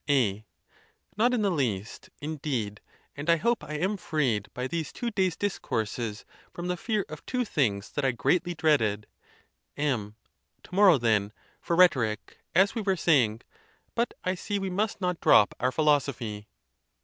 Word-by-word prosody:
A, 110 -7 +1 0.7
Not 235 +4 +3
in 240 -4 +1
the 200 - +2
least, 115 - -2
indeed; 135 -9 -3 0.3
and 145 +3 -5
I 170 - +7
hope 235 +8 0
I 150 - -6
am 190 +7 0
freed 130 - -1
by 125 - -4
these 160 +4 -3
two 240 -1 -4
days' 190 -5 +1
discourses 115 - -3 0.3
from 175 +1 -6
the 180 - 0
fear 210 +2 -1
of 155 - -9
two 250 -1 0
things 110 - 0
that 145 - -2
I 135 - +3
greatly 175 +8 0
dreaded. 115 -11 +2 0.7
M. 120 -8 -1 0.5
To - - -16
morrow, 190 -4 +6
then, 110 -4 +1 0.3
for 170 - -1
rhetoric, 130 - +2 0.2
as 195 +2 +5
we 225 - -2
were 195 -2 +1
saying. 120 -10 +3 0.5
But 235 +1 -1
I 185 - 0
see 205 +2 -3
we 195 -1 -3
must 200 +2 -1
not 180 -2 -1
drop 105 - +6
our 125 +1 +1
philosophy. 130 -8 0
150 Hz, 160 wpm, -27 LUFS, 115-185 Hz, 0.7 s, I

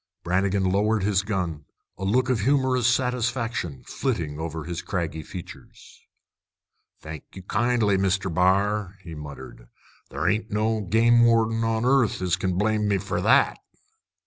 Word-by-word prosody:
Brannigan 95 +2 +1
lowered 100 +3 +1
his 100 -1 +2
gun, 90 -8 -3 0.3
a 95 - -8
look 120 +6 +2
of 125 -3 +1
humorous 130 0 +2
satisfaction 120 - -1
flitting 85 - -3
over 80 -1 -4
his 85 +2 -5
craggy 85 -4 -3
features. 90 +3 -11 1.0
"Thank 80 -2 -9
you, 95 - -9
kindly, 110 -1 +1
Mr. 95 -1 0
B'ar," 100 +2 +1
he 85 -2 -9
muttered. 70 -5 -10 0.4
"Ther - - -2
ain't 110 +3 0
no 110 +1 0
game 115 +4 +4
warden 115 -1 +3
on 115 +1 0
'arth 130 -3 +3
as 90 -2 +1
kin 95 0 -2
blame 105 +1 +1
me 100 -1 +2
for 100 +1 -3
that!" - - +3
100 Hz, 145 wpm, -25 LUFS, 90-115 Hz, 1.0 s, game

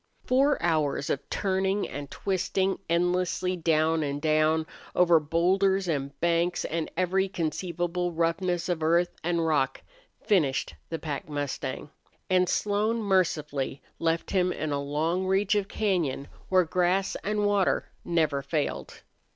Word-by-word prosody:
Four 275 +3 +3
hours 155 -4 +1
of 140 - -3
turning 195 +1 0
and 145 0 -7
twisting, 190 +1 -1
endlessly 180 +1 +1
down 160 -1 +2
and 145 -1 -2
down, 155 +1 +2 0.3
over 175 -2 +5
bowlders 185 +5 +2
and 140 -4 -3
banks 170 +1 +1
and 165 0 -2
every 190 +2 +2
conceivable 175 +1 -2
roughness 170 +2 0
of 175 -3 -1
earth 170 +3 +2
and 170 0 0
rock, 140 -4 0 0.4
finished 155 - +1 0.2
the 165 - -2
pack 150 -2 -5
mustang; 145 -2 -4 0.4
and 185 -1 +3
Slone 210 +3 +1
mercifully 155 -9 0 0.2
left 165 0 0
him 180 -2 +2
in 155 -3 -3
a 140 0 -1
long 160 +6 -1
reach 195 +2 +2
of 205 -2 +1
cañon 175 -11 -1 0.2
where 185 -1 +5
grass 180 +3 +1
and 210 0 0
water 205 -2 +1
never 155 -5 +1
failed. 150 +1 -3
170 Hz, 135 wpm, -27 LUFS, 155-190 Hz, 0.4 s, over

